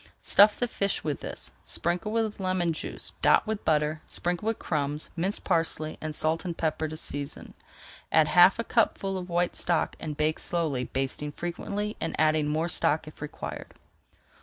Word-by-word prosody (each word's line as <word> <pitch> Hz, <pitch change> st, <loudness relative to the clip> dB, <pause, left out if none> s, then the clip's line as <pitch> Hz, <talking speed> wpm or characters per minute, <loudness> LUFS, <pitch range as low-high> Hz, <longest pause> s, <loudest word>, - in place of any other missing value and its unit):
Stuff 205 Hz, +1 st, +6 dB
the 245 Hz, -, +1 dB
fish 200 Hz, -4 st, -1 dB
with 150 Hz, -2 st, -2 dB
this, -, -, -5 dB
sprinkle 175 Hz, +5 st, -1 dB
with 220 Hz, -2 st, -1 dB
lemon 185 Hz, -3 st, 0 dB
juice, 155 Hz, -, -6 dB
dot -, -, +5 dB
with 215 Hz, -1 st, -3 dB
butter, 150 Hz, 0 st, +1 dB
sprinkle 175 Hz, +4 st, -2 dB
with 225 Hz, -, +1 dB
crumbs, 150 Hz, -1 st, -2 dB
minced 185 Hz, +4 st, -2 dB
parsley, 155 Hz, -1 st, 0 dB
and 155 Hz, -1 st, -4 dB
salt 160 Hz, +1 st, +1 dB
and 175 Hz, -3 st, -4 dB
pepper 160 Hz, -1 st, -1 dB
to 155 Hz, +1 st, -7 dB
season. 145 Hz, -2 st, -5 dB, 0.6 s
Add 155 Hz, -1 st, +5 dB
half 180 Hz, +2 st, +7 dB
a 230 Hz, -, -1 dB
cupful 200 Hz, -5 st, +1 dB
of 180 Hz, -1 st, -5 dB
white 175 Hz, 0 st, +1 dB
stock 175 Hz, -2 st, 0 dB
and 150 Hz, -2 st, -5 dB
bake 155 Hz, 0 st, +1 dB
slowly, 155 Hz, -7 st, 0 dB
basting 135 Hz, +3 st, -3 dB
frequently 200 Hz, +6 st, -4 dB
and 165 Hz, -, -2 dB
adding 155 Hz, -1 st, +3 dB
more 160 Hz, +3 st, 0 dB
stock 155 Hz, -2 st, +1 dB
if 155 Hz, -, -12 dB
required. 150 Hz, -, -6 dB
165 Hz, 170 wpm, -28 LUFS, 155-190 Hz, 0.6 s, half